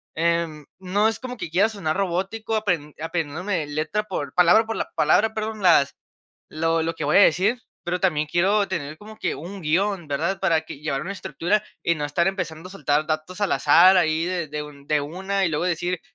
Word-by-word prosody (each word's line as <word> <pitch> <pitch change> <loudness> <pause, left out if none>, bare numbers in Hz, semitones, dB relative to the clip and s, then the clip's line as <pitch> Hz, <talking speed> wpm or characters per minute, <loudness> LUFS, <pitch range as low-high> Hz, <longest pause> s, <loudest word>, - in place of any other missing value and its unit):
em, 165 -2 0
no 190 +3 +1
es 220 -1 0
como 250 -1 -7
que 190 - -5
quiera 190 +7 +3
sonar 180 -8 -2
robótico, 195 +4 -2
apren 175 -9 -1
aprendiendóme 165 +2 -2
letra 155 +8 -2
por 185 -9 -5
palabra 180 +6 +5
por 225 0 -4
la - - -4
palabra, 220 +1 +3
perdón, 215 0 -4
las 165 -6 +4 0.5
lo 165 +1 0
lo 165 +1 -2
que - - -4
voy - - +2
a - - +8
decir, 200 +7 +3 0.2
pero 180 +1 -2
también 155 -5 +1
quiero 200 +5 +2
tener 155 -5 -4
como 215 +1 -12
que - - -1
un 190 +6 -8
guión, 180 +3 0
¿verdad?, 160 +7 -1
para 165 -4 +2
que 160 - -10
llevar 140 -3 -2
una 190 - -4
estructura 200 +1 -1 0.2
y 170 - +2
no 150 -2 -3
estar 170 +4 0
empezando 180 -3 -3
a - - -13
soltar 150 -4 0
datos 155 +4 -3
al 205 - +1
azar 175 +6 +6
ahí 160 -1 +1
de 175 -3 -2
de 150 +1 -4
un 145 -1 -12
de 150 0 +2
una 190 +6 -2
y - - +2
luego 155 +2 -1
decir, 175 0 -1
175 Hz, 210 wpm, -23 LUFS, 155-195 Hz, 0.5 s, a